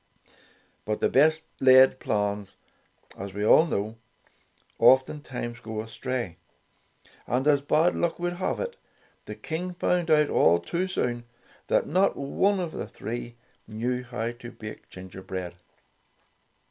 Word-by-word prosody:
But 105 0 -2
the - - +2
best 155 +3 +4 0.2
laid 130 0 +6
plans, 100 -1 -2 0.6
as 100 0 -8
we 105 +1 -1
all 160 +9 +6
know, 110 -4 -3 0.8
oftentimes 130 -3 +2
go 110 -2 -6
astray. 115 -4 -4 0.9
And 130 +4 0
as 145 -2 +4
bad 155 +4 +3
luck 170 -1 -1
would 175 0 -3
have 185 - -2
it, 480 -1 -4 0.5
the - - -7
King 175 +3 -5
found 175 -1 0
out 150 -1 +4
all 85 - +5
too 170 - -2
soon, 120 -9 -2 0.4
that - - +2
not 190 +5 +2
one 190 +8 +1
of 175 -3 -3
the - - -5
three 120 +1 -6 0.3
knew 120 +3 -2
how 120 -2 -3
to 120 0 -10
bake 105 -1 -10
gingerbread. 95 -1 -7
125 Hz, 135 wpm, -26 LUFS, 110-160 Hz, 0.9 s, laid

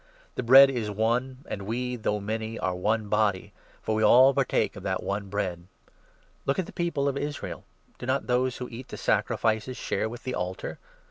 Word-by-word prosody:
The - - -3
Bread 135 +3 +8
is 120 -5 -2
17 105 - -5
one, 125 +4 +1
and 100 - -4
we, 125 +2 -2
though 105 -2 -1
many, 110 +2 -4
are 90 - -1
one 105 +4 0
body; 100 -2 0 0.3
for 110 - -1
we 110 - 0
all 130 +5 +7
partake - - +1
of - - -8
that - - -2
one 100 0 -3
Bread. 90 -4 -3 0.8
Look 135 - +1
at 190 - 0
the - - -11
people 160 -5 -1
of 140 -1 0
Israel. 145 0 -5 0.3
Do 120 - -6
not 130 +1 0
those 125 0 +1
18 - - -8
who 115 - -10
eat 125 +2 -8
the - - -8
sacrifices 110 +3 0
share 110 - -1
with 120 +2 -9
the 130 - -3
altar 90 +1 -4
115 Hz, 205 wpm, -27 LUFS, 105-130 Hz, 0.8 s, Bread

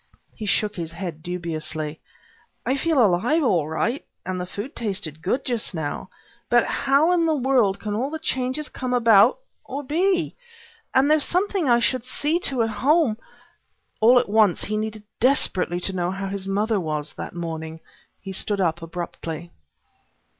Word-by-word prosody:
He 215 - -6
shook 210 +1 0
his 165 -1 -5
head 170 -4 -6
dubiously. 160 -3 -4 0.7
"I 265 - +1
feel 280 -3 +3
alive 230 - +2
all 175 - +2
right, 225 - -1 0.2
and 185 0 -3
the 180 - -5
food 205 +9 -6
tasted 195 -8 -3
good 245 +10 -1
just 235 -6 -2
now, 155 -3 -4 0.4
but - - +4
how 280 +5 +2
in 340 -2 +3
the 315 - +2
world 250 -7 +2
can 210 -1 -4
all 245 +6 -1
the 320 - -4
changes 260 -1 -2
come 255 -1 -3
about, 230 - +6 0.3
or 285 +2 -5
be? 350 +7 +1 0.6
And 270 +3 +4
there's 310 -2 +4
something 370 -4 0
I 240 - +6
should 235 +1 0
see 300 +6 0
to, 255 -4 +1
at 225 - -1
home 265 +2 +2 0.4
" - - -47
All 240 +3 +7
at - - +3
once 210 -3 +3
he 215 - -2
needed 215 0 -3 0.2
desperately 200 - +3
to 190 - -2
know 175 -1 -1
how 195 +1 -4
his 195 -1 -4
mother 210 +2 +1
was, 155 -3 -3
that - - -7
morning. 160 -1 -5 0.4
He 195 - -7
stood 200 +2 0
up 170 -2 0
abruptly. 165 0 -6
215 Hz, 170 wpm, -23 LUFS, 175-265 Hz, 0.7 s, All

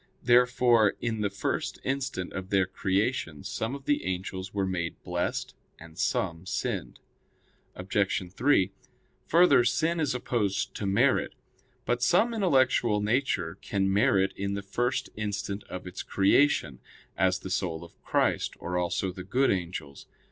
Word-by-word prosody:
Therefore 120 -2 +4
in 110 -2 -2
the 100 - +1
first 100 +1 -2
instant 130 -9 -3
of 95 0 -5
their 95 -2 +3
creation 95 - -1
some 115 +5 -3
of 140 -1 -10
the 145 - +1
angels 95 +1 -4
were 100 -1 -1
made 85 -3 -2
blessed, 90 0 -2 0.2
and 80 0 -13
some 85 +1 -1
sinned. - - -3 0.8
Obj. 95 -1 -1
3: 105 -6 +3 0.6
Further, 170 -6 +5
sin 165 +7 +1
is 140 -5 0
opposed 100 -6 -1
to 100 - -4
merit. 95 +1 +2 0.5
But 120 0 0
some 180 - +3
intellectual 130 - +3
nature 105 -6 0
can 95 -1 0
merit 100 -3 +3
in 100 0 -2
the 100 - -4
first 120 +6 -1
instant 105 -1 -3
of 90 0 -7
its 90 - -6
creation; 95 - +2 0.4
as 95 -1 +2
the 95 0 -8
soul 85 -3 -2
of 85 - -16
Christ, - - 0
or 90 0 -2
also 90 +2 -1
the 90 0 -8
good 130 +8 +2
angels. 85 -6 -4
100 Hz, 145 wpm, -28 LUFS, 95-125 Hz, 0.8 s, Further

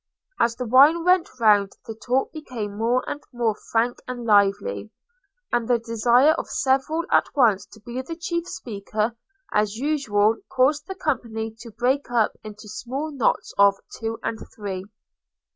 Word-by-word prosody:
As 230 0 +2
the 250 +1 -4
wine 285 +8 +6
went 365 -1 +4
round 205 -3 +4
the 225 - -6
talk 250 +4 -1
became 245 -10 -6
more 235 +4 0
and 290 - -4
more 235 -3 0 0.2
frank 235 +2 +1
and 245 -2 -5
lively, 195 - +2 0.6
and 240 -2 0
the 245 - +3
desire 235 +5 +3
of - - -6
several 270 +5 +1
at - - +4
once 225 -8 +3
to 220 - -16
be 240 +4 -5
the 330 +6 -7
chief 340 0 -3
speaker, 215 0 -3 0.4
as 210 0 +1
usual 230 -6 +1
caused 285 +3 +2
the 385 - -5
company 225 -9 -3
to 230 - -10
break 250 +5 0
up 235 -3 +2
into 215 0 -10
small 265 +8 -5
knots 270 -6 0
of 200 0 +6 0.2
two 225 0 -4
and 225 - -3 0.2
three. 195 -3 -5
235 Hz, 160 wpm, -24 LUFS, 215-270 Hz, 0.6 s, wine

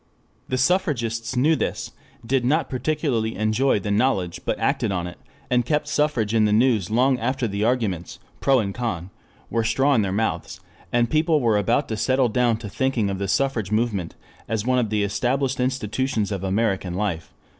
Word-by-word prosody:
The 130 - 0
suffragists 130 - 0
knew 150 +6 +3
this, - - -3 0.3
did 130 +1 +1
not 150 +6 +1
particularly 130 -5 -1
enjoy 110 +4 +2
the 100 +1 -3
knowledge 100 -6 +1
but - - 0
acted - - 0
on 90 -2 -2
it, 90 - -8 0.3
and 125 -1 +2
kept 150 +4 0
suffrage 150 -8 0
in 110 -1 +4
the 105 - +2
news 110 -4 +3
long 125 +3 +2
after 130 +1 -1
the 100 0 -2
arguments 110 -8 -1 0.2
pro 135 -1 +3
and 100 -5 -1
con 100 -7 -4 0.4
were 115 -1 +1
straw 135 +6 +2
in 115 - +3
their 100 -2 -1
mouths, 110 +3 -2 0.3
and 120 -1 +1
people 155 0 +3
were 115 -5 +2
about 120 +7 +1
to 110 - -2
settle 130 +2 +2
down 120 0 +2
to 110 -2 -8
thinking 120 -3 0
of 95 - -4
the 100 - -2
suffrage 115 -3 0
movement 105 -6 -1 0.3
as 110 -1 -1
one 125 0 +2
of 115 -3 0
the 105 -1 +1
established 130 +6 0
institutions 125 -3 -1
of 100 -2 -3
American 95 -2 0
life. 95 -5 -2
115 Hz, 185 wpm, -23 LUFS, 105-130 Hz, 0.4 s, in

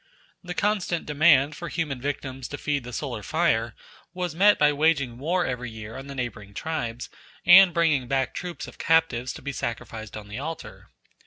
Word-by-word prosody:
The 180 0 -6
constant 200 -5 0
demand 150 -1 +4
for 170 +1 -6
human 150 -7 -3
victims 135 -2 -4
to 145 - -6
feed 145 -3 -1
the 125 - -8
solar 120 -3 -4
fire 120 -6 0 0.4
was 180 -3 -2
met 205 +5 +5
by 150 0 +4
waging 140 -5 +1
war 175 +5 0
every 125 -1 -3
year 110 0 -9
on 135 - -8
the 140 - -7
neighbouring 110 -6 -5
tribes 125 -6 -3 0.4
and 190 +1 +9
bringing 160 -7 +2
back 135 +1 0
troops 180 -1 -5
of - - -13
captives 160 -7 +2
to - - -11
be 140 - -3
sacrificed 110 -4 -5
on 105 -1 -9
the 110 +4 -6
altar. 160 +3 -7
140 Hz, 180 wpm, -25 LUFS, 120-165 Hz, 0.4 s, and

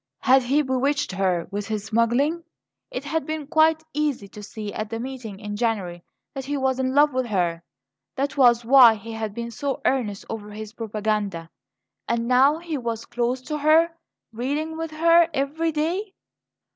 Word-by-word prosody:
Had 265 +1 +5
he 275 +5 +2
bewitched 265 -2 0
her 185 -3 0
with 205 0 -4
his 215 -2 -3
smuggling? 240 +10 +1 0.5
It 255 - -5
had 320 +3 -2
been 310 -1 -3
quite 315 +1 +3
easy 290 -8 -1
to 210 - -11
see 210 0 -7
at 215 0 -4
the 225 0 -4
meeting 240 -5 -7
in 210 -1 -5
January 200 -6 -2 0.3
that 270 -1 -6
he 285 +1 -2
was 265 -1 0
in 260 0 -1
love 295 0 +5
with 255 -1 -1
her; 175 -5 0 0.5
that 280 +1 -2
was 240 -4 +4
why 245 -2 +8
he 225 +2 -9
had 220 -2 -4
been 235 0 -5
so 280 +3 -3
earnest 220 -7 0
over 210 -2 -6
his 215 0 -8
propaganda. 210 -6 -3 0.6
And 235 0 -1
now 265 +5 +4
he 330 -3 -4
was 230 -2 -4
close 245 +1 -1
to 300 +2 -4
her 315 +3 +4 0.4
reading 290 +7 -2
with 325 0 -4
her 335 +2 +4
every 305 +4 0
day. 350 +7 -2
255 Hz, 175 wpm, -24 LUFS, 215-295 Hz, 0.6 s, why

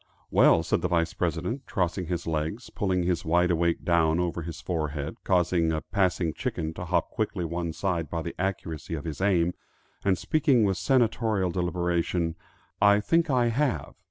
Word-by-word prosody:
"Well," - - +5
said - - 0
the - - +1
Vice 85 -1 +1
President, 90 - -2
crossing 90 -1 -1
his 85 -1 -3
legs, 80 +8 -3
pulling 95 -4 0
his 90 -1 0
wide 90 +2 +2
awake 85 0 0
down 85 -1 +3
over 85 -1 -1
his 85 0 -6
forehead, 75 -4 -3
causing 90 -3 +2
a 80 -1 -1
passing 90 -5 0
chicken 80 0 -3
to 90 - -6
hop 85 -1 0
quickly 105 -5 -2
one 85 0 -3
side 85 -3 -2
by 85 -1 -3
the 85 - -5
accuracy 85 -4 -3
of 75 - -6
his 80 +2 -5
aim, 90 -3 +2 0.5
and 95 -2 +2
speaking 140 - +2
with 95 -3 +1
senatorial 110 -3 +1
deliberation, 85 -1 -1 0.5
"I 100 0 +6
think 165 +12 +2
I 125 -3 +3
have. 135 +3 -1
90 Hz, 170 wpm, -27 LUFS, 85-100 Hz, 0.5 s, I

